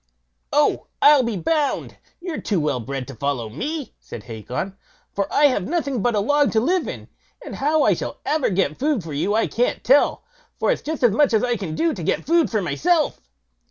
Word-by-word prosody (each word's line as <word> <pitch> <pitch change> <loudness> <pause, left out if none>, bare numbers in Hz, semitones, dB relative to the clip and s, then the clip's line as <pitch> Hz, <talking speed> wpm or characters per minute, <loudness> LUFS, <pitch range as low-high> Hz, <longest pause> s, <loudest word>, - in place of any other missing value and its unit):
"Oh! - - +2
I'll 290 -1 +7
be 235 -4 -2
bound 290 - -1 0.2
you're 345 -3 -5
too 200 -5 0
well 150 -4 0
bred 130 +2 -5
to 135 - -8
follow 130 -3 -2
me", 295 - -5
said 105 - -10
Hacon, 125 - -5 0.4
"for 200 -1 -2
I 295 - +2
have 255 -10 +2
nothing 280 - -1
but 240 0 +1
a - - +2
log 290 +7 +3
but - - -3
to 220 - +4
live 345 +9 +1
in; - - -7 0.4
and - - -7
how 300 +3 +2
I - - +4
shall - - -5
ever 305 -2 +1
get 180 -6 0
food 285 - 0
for 155 -2 -7
you 195 +9 0
I 225 - +2
can't 245 +1 -1
tell, 275 +3 +3 0.3
for - - +1
it's - - -1
just 310 -2 -4
as 240 - +6
much 250 +2 +3
as 215 - +2
I 245 -1 +1
can 185 -7 -5
do 330 -1 +1
to 185 - -7
get 160 - -1
food 335 +1 +3
for 215 -4 -1
myself." 330 - +1
235 Hz, 220 wpm, -22 LUFS, -, 0.4 s, I'll